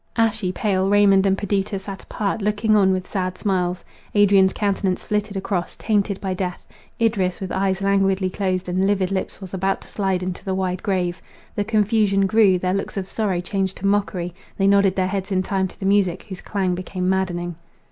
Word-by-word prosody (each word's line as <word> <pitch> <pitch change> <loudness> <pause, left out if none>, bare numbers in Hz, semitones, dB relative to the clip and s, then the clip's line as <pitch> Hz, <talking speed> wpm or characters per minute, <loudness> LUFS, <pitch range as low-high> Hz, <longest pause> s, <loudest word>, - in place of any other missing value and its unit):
Ashy 220 -4 +1
pale, 190 0 0
Raymond 200 -1 +5
and 195 0 +2
Perdita 200 0 -1
sat 195 0 -7
apart, 210 +1 -3
looking 210 +1 +2
on 195 -2 +4
with 185 -1 -1
sad 185 -2 -3
smiles. 180 -3 -1 0.3
Adrian's 195 -2 +5
countenance 195 -2 -1
flitted 210 -1 -2
across, 190 -2 -2
tainted 205 -2 0
by 190 -2 -2
death—Idris, 185 +2 -2
with 190 -2 -5
eyes 190 0 0
languidly 195 -1 +2
closed 185 -1 -2
and 185 +2 +1
livid 195 -2 +1
lips, 190 -1 -3
was 190 -2 -9
about 190 +1 0
to - - -14
slide 190 -3 -1
into 180 -1 -4
the 190 -1 -2
wide 185 -1 -1
grave. 180 -2 -1 0.3
The 205 - -1
confusion 210 -2 +2
grew—their 190 -3 +3
looks 195 +1 -3
of 190 -1 -3
sorrow 195 -4 -1
changed 190 +1 -2
to 200 - -6
mockery; 195 -3 0 0.2
they 195 - +2
nodded 200 -1 +4
their 185 - +1
heads 195 +1 -3
in 185 -1 +1
time 190 -1 0
to - - -17
the 195 - -4
music, 195 -3 +2
whose 190 -2 -8
clang 190 -3 -1
became 180 0 -3
maddening. 175 -2 -1
195 Hz, 190 wpm, -22 LUFS, 185-200 Hz, 0.3 s, Raymond